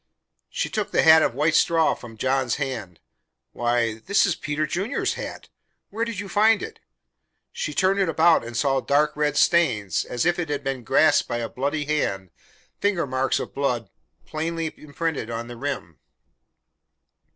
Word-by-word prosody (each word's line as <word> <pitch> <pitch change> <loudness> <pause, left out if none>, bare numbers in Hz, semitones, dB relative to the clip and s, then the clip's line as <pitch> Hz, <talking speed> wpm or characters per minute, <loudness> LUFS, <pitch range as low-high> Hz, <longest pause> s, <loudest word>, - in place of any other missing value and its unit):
She - - -2
took 215 -2 -3
the - - +2
hat 160 0 +8
of 120 - +1
white 155 +4 +2
straw 165 +1 +3
from 115 -2 -11
John's 130 0 0
hand. 115 - -5 0.5
"Why! 120 -2 0
This 200 - +2
is 185 - +1
Peter 150 0 -2
Junior's 190 +8 -1
hat! - - -7 0.4
Where 225 +3 -1
did 230 -4 -5
you 205 - -5
find 215 +3 +3
it?" 445 0 -8 0.7
She 485 +1 -4
turned 195 +1 +2
it 190 -3 +2
about 165 -1 +4
and 120 0 -6
saw 135 +1 +2
dark 150 +3 +1
red 150 0 0
stains, 125 - +2
as 120 +5 -2
if 175 0 +2
it 165 -3 -3
had 145 -1 -2
been 135 -2 -3
grasped 150 +7 +3
by 120 - -2
a 115 -1 -3
bloody 145 +5 -2
hand 95 - -2 0.5
finger 200 -5 +1
marks 130 0 0
of - - -6
blood 125 -5 -2 0.3
plainly 165 +1 -3
imprinted 150 -4 -4
on 115 0 -4
the 120 - -8
rim. 130 - -5
145 Hz, 170 wpm, -24 LUFS, 120-170 Hz, 0.7 s, hat